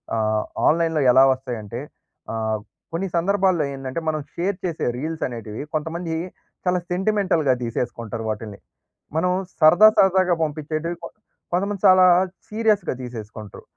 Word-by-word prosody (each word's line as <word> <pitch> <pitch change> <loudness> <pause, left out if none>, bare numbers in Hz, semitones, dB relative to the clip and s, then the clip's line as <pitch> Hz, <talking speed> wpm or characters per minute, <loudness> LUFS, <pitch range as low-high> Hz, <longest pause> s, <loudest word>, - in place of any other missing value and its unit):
ఆహ్! 110 -1 +1 0.2
ఆన్‌లైన్‌లో 160 -1 +2
ఎలా 130 +2 +7
వస్తాయంటే 120 -4 -6 0.5
ఆహ్! 110 -1 -1 0.3
కొన్ని 180 +4 -1
సందర్భాల్లో 185 -2 +2
ఏందంటే 135 +3 -5
మనం 155 -1 -1
షేర్ 185 +2 -1
చేసే 170 -3 -2
రీల్స్ 160 +3 -4
అనేటివి 115 -1 -6
కొంతమంది 160 +2 -3 0.5
చాలా 180 0 +2
సెంటిమెంటల్‌గా 180 -7 +1
తీసేసుకుంటారు 115 -1 -4
వాటిని. 105 -1 -7 0.6
మనం 180 +3 +2 0.3
సరదా 175 +7 +8
సరదాగా 185 -1 +4
పంపించేటివి 155 +2 -3
కొ - - -4 0.5
కొంతమంది 200 +2 -1
చాలా 185 0 +7 0.4
సీరియస్‌గా 215 -4 +1
తీసేసుకుంట్రు. 110 -4 -9
155 Hz, 120 wpm, -22 LUFS, 120-180 Hz, 0.6 s, సరదా